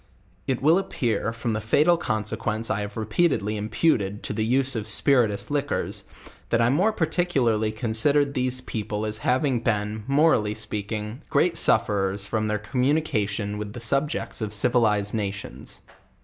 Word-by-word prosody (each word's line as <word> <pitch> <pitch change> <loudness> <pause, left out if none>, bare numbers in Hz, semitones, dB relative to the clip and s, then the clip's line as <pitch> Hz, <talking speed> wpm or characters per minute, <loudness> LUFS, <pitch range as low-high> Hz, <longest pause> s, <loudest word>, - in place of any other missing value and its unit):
It 130 -1 -1
will 160 +5 +5
appear 115 - -1
from 115 0 -3
the 110 - -2
fatal 150 +10 +3
consequence 110 - -2
I 105 - -1
have 105 +1 -6
repeated 110 - +1
ly 105 - -2
imputed 105 -1 0
to - - -4
the 110 - -1
us 135 -1 +3
b 115 - -1
of 105 - -7
spirituous 115 -1 +2
liquors, 145 0 -2 0.4
that 115 - +2
I 115 0 +3
mere 180 - +3
par 180 -6 0
ticularly 125 -11 +1
considered 135 +6 +2
these 130 0 -1
people 110 -3 -4
as. 110 0 -1
having 130 0 +1
been, 105 -1 -1
morally 135 -7 +3
speaking, 105 +3 -4
grest 165 +4 +2
sufferers 100 -1 +1
from 110 +1 -1
their 105 0 0
communication 105 -4 -1
with 105 -1 -6
the 120 - -7
subjects 140 +3 -1
of 110 0 -3
civilized 105 -3 +2
nations. 100 -3 -5
110 Hz, 160 wpm, -25 LUFS, 105-135 Hz, 0.4 s, will